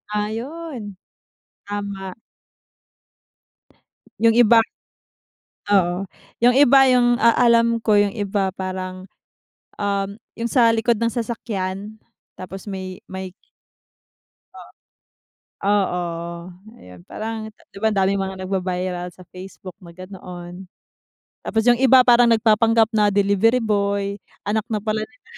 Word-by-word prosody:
Ayun. 230 - -5 0.7
Tama. 200 -2 -5 2.1
Yung 225 0 +4
iba 235 -1 +6 1.1
oo, 180 0 +2 0.4
yung 245 - +6
iba, 275 0 +6
yung 245 -2 +3
a 230 +1 +4 0.2
alam 230 0 +3
ko 215 -2 +3
yung 205 -1 +2
iba 200 -2 -2
parang, 185 0 -6 0.7
um, 200 0 -1 0.2
yung 230 - -3
sa 240 -4 +4
likod 230 0 +1
ng 230 - +2
sasakyan, 215 -3 -4 0.4
tapos 190 +3 -9
may 190 -1 -7
may 190 -1 -7 1.2
Oo. - - -12 1.0
Oo, 175 -4 -1 0.4
ayun, 90 -1 -14
parang 220 - -6
di 210 - -17
ba, 220 - +3
ang 210 - -3
daming 195 +1 +1
mga 190 0 -5
nagba-viral 180 -1 -3
sa 180 +1 -17
Facebook 185 0 -10
na 170 - -12
ganoon. 180 0 -10 0.7
Tapos 220 -1 -1
yung 240 0 +4
iba 260 -1 +6
parang 245 -1 +5
nagpapanggap 225 0 +3
na 210 -2 +3
delivery 205 +4 +2
boy, 200 -2 0 0.4
anak 215 +1 -1
na 215 -4 -3
pala 215 0 -2
nila. 250 0 -29
205 Hz, 115 wpm, -21 LUFS, 190-230 Hz, 2.1 s, iba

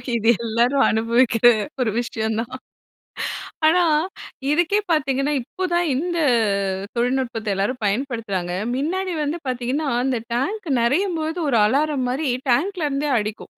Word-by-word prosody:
இது 225 0 +2 0.2
எல்லாரும் 240 +5 +2
அனுபவிக்கிற 230 +1 +2 0.4
ஒரு 225 -4 +1
விஷயம் 220 -2 -2
தான். 240 +2 -5 1.1
ஆனா, 350 +3 +5 0.7
இதுக்கே 350 +6 +2
பார்த்தீங்கன்னா, 275 -1 +1
இப்ப 370 +9 -4
தான் 345 0 +2
இந்த 340 +5 -1 0.8
தொழில்நுட்பத்த 235 -4 -1
எல்லாரும் 205 +7 -1
பயன்படுத்துறாங்க. 205 -6 -2 0.2
மின்னாடி 360 +6 -1
வந்து 300 +4 -2
பார்த்தீங்கன்னா, 255 +4 -1 0.2
அந்த 260 -3 0 0.2
டேங்க் 370 - -2
நெறையும்போது, 320 +5 0
ஒரு 235 - +3
அலாரம் 275 +1 +1
மாரி 280 +3 -1 0.2
டேங்க்லேருந்தே 295 -1 0
அடிக்கும். 215 +1 -5
265 Hz, 115 wpm, -22 LUFS, 230-315 Hz, 1.1 s, ஆனா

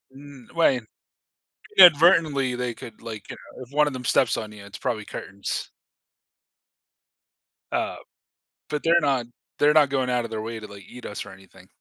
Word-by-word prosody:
Mm, 140 -3 -13
right. 135 -7 +3 1.0
Inadvertently, 155 -6 +6
they 125 -1 -3
could, 115 -1 -12
like, 110 -3 -8
you - - -6 0.2
know 130 - -7
if 130 +3 -16
one 150 0 +4
of 145 - -3
them 125 -1 -7
steps 125 0 +2
on 110 -1 -5
you, 105 -1 -12
it's 100 - -10
probably 110 -4 -3
curtains. 100 +1 -5 2.0
Uh, - - -2 0.7
but 150 -1 -3
they're 170 0 +4
not 135 -5 +1 0.3
they're 150 +1 +5
not 150 -3 +5
going 130 -2 0
out 125 -1 +1
of 115 - -6
their 110 -1 -4
way 115 0 -5
to, 105 - -9
like, 100 -1 -12
eat 125 0 -12
us 105 - -6
or 105 - -11
anything. 95 -1 -17
125 Hz, 180 wpm, -24 LUFS, 110-145 Hz, 2.0 s, Inadvertently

